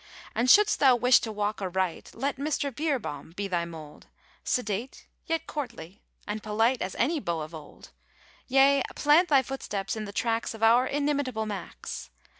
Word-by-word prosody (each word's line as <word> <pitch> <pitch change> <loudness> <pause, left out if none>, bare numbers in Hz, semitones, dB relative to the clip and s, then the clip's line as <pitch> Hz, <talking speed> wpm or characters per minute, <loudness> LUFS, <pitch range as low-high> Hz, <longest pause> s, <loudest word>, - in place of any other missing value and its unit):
And 245 +2 +1
should'st 420 +7 +6
thou 265 -3 +6
wish 250 +1 +5
to 225 - -5
walk 210 0 -2
aright, 185 -2 -2
Let 275 +4 -2
Mr. 285 -1 -2
Beerbohm 260 - -3
be 200 0 -3
thy 175 -3 -1
mould; 160 -3 -11 0.4
Sedate 225 +1 -2 0.2
yet 325 -1 -1
courtly, 235 - -7 0.3
and 210 +1 -3
polite 225 +4 +1
As 185 - -3
any 300 +7 +1
beau 170 - -2
of 155 +2 -7
old; 155 -2 -12 0.6
Yea, 275 +1 +5
plant 310 +4 +4
thy 275 -3 +5
footsteps 210 -7 -4
in 215 -1 -4
the 200 - -7
tracks 225 +2 -1
Of 225 - -7
our 240 +3 +5
inimitable 280 -6 -1
Max! 205 -4 -6
230 Hz, 165 wpm, -27 LUFS, 200-275 Hz, 0.6 s, should'st